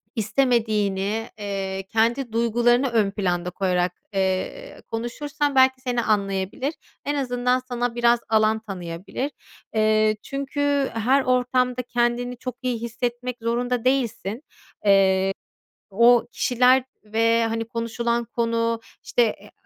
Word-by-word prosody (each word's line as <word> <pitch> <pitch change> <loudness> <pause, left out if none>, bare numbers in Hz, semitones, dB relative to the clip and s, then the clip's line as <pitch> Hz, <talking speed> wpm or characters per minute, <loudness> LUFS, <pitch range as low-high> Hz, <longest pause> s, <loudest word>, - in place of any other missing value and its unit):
istemediğini, 220 -3 0
ııı, 195 -1 -3
kendi 235 +2 +1
duygularını 240 +3 +2
ön 215 -4 +2
planda 180 -3 -1
koyarak, 180 -1 0 0.2
ııı, 190 -1 -2
konuşursan 280 +5 -2
belki 260 0 +4
seni 245 -2 0
anlayabilir. 200 - -1 0.3
En 290 - -1
azından 250 -2 +1
sana 245 -1 -3
biraz 240 0 +4
alan 220 0 +3
tanıyabilir. 190 - -5 0.4
Eee, 215 0 +3
çünkü 280 0 -1
her 255 +5 +2
ortamda 250 0 +1
kendini 245 0 -1
çok 255 -1 -6
iyi 245 -3 -2
hissetmek 240 +1 -3
zorunda 245 +1 -1
değilsin. 255 -7 0
Eee, 245 - -10 1.5
o 235 +3 +5
kişiler 250 +1 +3 0.2
ve, 230 +2 +2
hani, 225 0 -2
konuşulan 235 0 -1
konu, 230 0 0 0.2
işte, 245 - +1
e, 220 - -3
235 Hz, 115 wpm, -23 LUFS, 215-250 Hz, 1.5 s, o